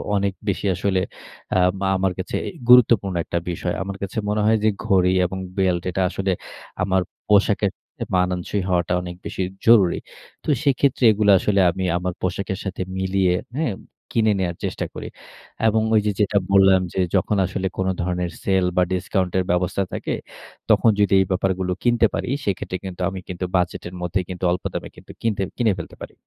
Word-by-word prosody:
অনেক 100 -1 +1 0.2
বেশি 100 - -2
আসলে 95 +1 0 0.6
আম 90 +1 +3 0.2
আমার 95 0 +1
কাছে 95 - -4
এই - - -11
গুরুত্বপূর্ণ 115 -6 +6
একটা 85 - -2
বিষয়। 90 0 -2
আমার 100 0 -6
কাছে 100 - -5
মনে 105 0 +1
হয় 110 +1 +4
যে 110 - +5 0.2
ঘড়ি 95 -4 +3
এবং 95 +2 -4 0.2
বেল্ট 90 -2 +2
এটা 95 - -1
আসলে 95 0 -1 0.5
আমার 95 0 +2 0.3
পোশাকের 100 -1 +3 0.3
এ - - -1
মানানসই 90 +2 0
হওয়াটা 90 -1 +1
অনেক 90 0 -7
বেশি - - -4 0.2
জরুরি। 105 -7 +6 0.5
তো - - -5
সেক্ষেত্রে 140 -2 +2
এগুলা 105 -1 +3
আসলে 100 +1 +1
আমি 95 +2 -4
আমার 90 0 -2
পোশাকের 95 +1 -2
সাথে 95 -1 -4 0.2
মিলিয়ে, 95 -1 +1 0.2
হ্যাঁ? 155 -8 0 0.4
কিনে 110 -2 +3
নেয়ার 90 -2 -1
চেষ্টা - - -3
করি। - - -6 0.6
এবং 110 0 +3
ওই 110 - +6
যে 105 - +2
যেটা 105 0 +2
বললাম, 95 -1 +6
যে - - -2 0.2
যখন 95 +2 +1
আসলে 95 0 -2
কোন 95 - 0
ধরনের 90 0 -2
সেল 95 -2 +2
বা 90 - +5
ডিসকাউন্ট 90 0 -1
এর 95 - +2
ব্যবস্থা 90 +2 0
থাকে, - - -3 0.6
তখন - - +5
যদি 100 -1 +3
এই - - +1
ব্যাপারগুলো 95 0 0
কিনতে 120 -1 +4
পারি, - - -2 0.2
সেক্ষেত্রে 95 -2 -2
কিন্তু 95 -1 -7
আমি 95 -1 -6
কিন্তু 90 0 -4
বাজেটের 90 0 -1
মধ্যেই 90 +1 -1
কিন্তু 90 0 -7
অল্প 90 - -2
দামে - - -4
কিন্তু - - -13
কিনতে 110 -4 0 0.2
কিনে 115 -4 +2
ফেলতে - - -8
পারি। - - -8
95 Hz, 180 wpm, -22 LUFS, 90-100 Hz, 0.6 s, গুরুত্বপূর্ণ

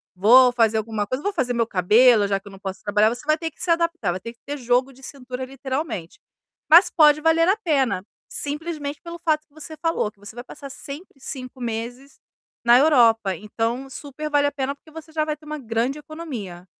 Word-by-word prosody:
vou 245 +6 +6
fazer 225 -2 +2
alguma 215 -1 -2
coisa. 255 +6 -3
Vou 405 - 0
fazer 260 -9 -1
meu 230 -1 0
cabelo, 210 +3 +4
já 195 -1 0
que 200 - -18
eu - - -10
não 195 - -12
posso 190 -1 -6
trabalhar", 210 +1 +3
você 245 +1 -6
vai 310 +1 +3
ter 325 0 -4
que - - -13
se 365 - -2
adaptar, 335 - +1
vai 185 - -4
ter 230 +5 -8
que 235 - -37
ter 290 0 -5
jogo 250 +1 +1
de 265 +1 -19
cintura, 255 -2 -7
literalmente, 265 - -5 0.5
mas 335 +5 +8
pode 300 -1 +5
valer 325 +1 +3
a 410 - +3
pena, 275 - 0 0.3
simplesmente 295 -1 -2
pelo 340 0 -8
fato 310 -2 0
que 290 - -35
você 310 0 -7
falou, 330 -10 -1
que 205 - -43
você 205 +1 -10
vai 245 - -7
passar 275 0 -10
sempre 290 +1 -9
5 255 -1 -6
meses 240 +4 -5 0.5
na 240 +1 +7
Europa, 230 - +4
então 230 +7 -3
supervale 290 +1 -1
a - - -1
pena, 275 0 -2
porque 315 - -21
você 320 0 -11
já 310 -1 0
vai 305 -1 -2
ter 305 - -19
uma 305 0 -5
grande 240 +4 -2
economia. 250 - -8
265 Hz, 215 wpm, -23 LUFS, 225-305 Hz, 0.5 s, mas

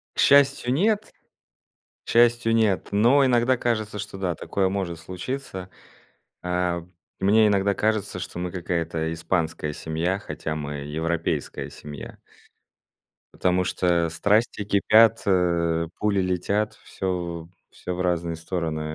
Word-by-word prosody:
К - - -7
счастью, 140 -3 +4
нет, 210 +8 +1 0.9
к - - -11
счастью 120 -1 +4
нет. 110 -4 +1
Но 120 +7 +4
иногда 125 0 +3
кажется, 110 -3 -2
что 100 0 -6
да, 90 -3 -2
такое 95 +2 -1
может 95 -4 -3
случиться. 95 - -6 0.7
А, 90 -1 -1 0.4
мне 110 +3 +5
иногда 100 -1 +2
кажется, 110 -3 -1
что 90 -1 -6
мы 90 0 -3
какая-то 85 -2 -2
испанская 80 -2 -2
семья, 80 +5 -2
хотя 80 -5 -5
мы 75 -1 -4
европейская 80 +3 -2
семья. 75 -2 -9 1.2
Потому 90 0 +1
что, 85 -2 +1
страсти 105 +6 +1
кипят, 110 +3 +5
э, 85 -3 +1
пули 105 -2 +1
летят, 100 +4 0
всё 85 -3 -4 0.2
всё, 90 - -6
в 90 - -3
разные 85 -2 0
стороны, 80 -1 -3
90 Hz, 125 wpm, -24 LUFS, 85-110 Hz, 1.2 s, мне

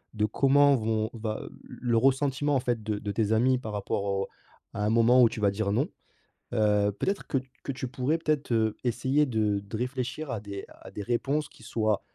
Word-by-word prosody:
de 105 -1 +2
comment 140 +5 +4
vont 110 -2 0
va, 110 -2 -4
heu, - - -9 0.2
l - - -10
le 115 - +4
ressentiment 135 +2 +2
en - - +3
fait 120 -4 -1
de 105 -1 -2
de 105 - -3
tes 110 0 0
amis 125 +3 +3
par 110 -3 -6
rapport 100 0 -2
au 100 -1 -1 0.5
à 105 - -2
un - - +2
moment 115 +2 +5
où 115 - +6
tu - - -6
vas 100 -1 +3
dire 100 0 -1
«non». 130 +7 +1 0.7
Heu, 105 -2 +3
peut-être 195 0 -2
que 135 - 0
t 130 0 -15
que 140 - -3
tu 130 0 -4
pourrais 140 +4 0
peut-être, 150 -4 -1
heu, 110 -1 +1
essayer 130 +5 +2
de 110 -4 +1
de 100 +2 -6
réfléchir 130 +3 -3
à 115 - -2
des 100 -1 -7
à - - -13
des - - -6
réponses 135 +6 -1
qui - - -18
soient, 110 -2 0
115 Hz, 220 wpm, -28 LUFS, 105-135 Hz, 0.7 s, où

